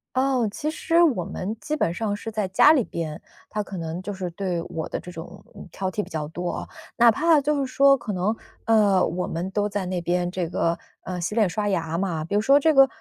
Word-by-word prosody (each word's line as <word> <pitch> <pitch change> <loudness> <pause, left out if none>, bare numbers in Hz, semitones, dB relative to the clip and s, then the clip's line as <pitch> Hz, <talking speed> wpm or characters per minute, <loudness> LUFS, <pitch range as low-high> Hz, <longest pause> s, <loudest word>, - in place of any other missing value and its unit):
哦， 260 -2 +2
其 305 +7 -2
实 330 +2 +2
我 255 - +2
们 195 +3 -4
基 305 +6 -3
本 175 - 0
上 205 +1 -1
是 225 - -6
在 215 -2 -1
家 190 +11 +6
里 270 -8 +2
边， 160 -1 -5 0.3
他 210 0 -2
可 195 -2 -7
能 165 +2 -4
就 205 +2 -4
是 185 -2 -4
对 175 -1 -3
我 165 -2 -4
的 - - -3
这 180 - -10
种， 175 +3 -10
嗯， - - -10
挑 190 -1 -3
剔 210 - -2
比 - - -15
较 150 -2 -3
多 175 +2 -4
哦。 - - -5 0.3
哪 235 0 +7
怕 310 +5 +4
就 295 +1 0
是 265 -2 -2
说 275 +1 +6
可 230 -5 -5
能， 195 +5 0 0.3
呃， 205 -5 +4
我 180 +1 -2
们 175 +3 -3
都 205 +1 +1
在 200 -2 -2
那 180 -1 -2
边 175 +1 0
这 180 -2 -3
个， 170 -1 0 0.3
呃， 180 -1 -4
洗 180 +4 -3
脸 215 -5 +3
刷 205 +5 -2
牙 165 -5 -1
嘛， 170 -4 -2
比 200 - -4
如 210 - +3
说 275 +5 +5
这 315 +2 +3
个， 270 -1 +8
195 Hz, 265 characters per minute, -24 LUFS, 175-235 Hz, 0.3 s, 个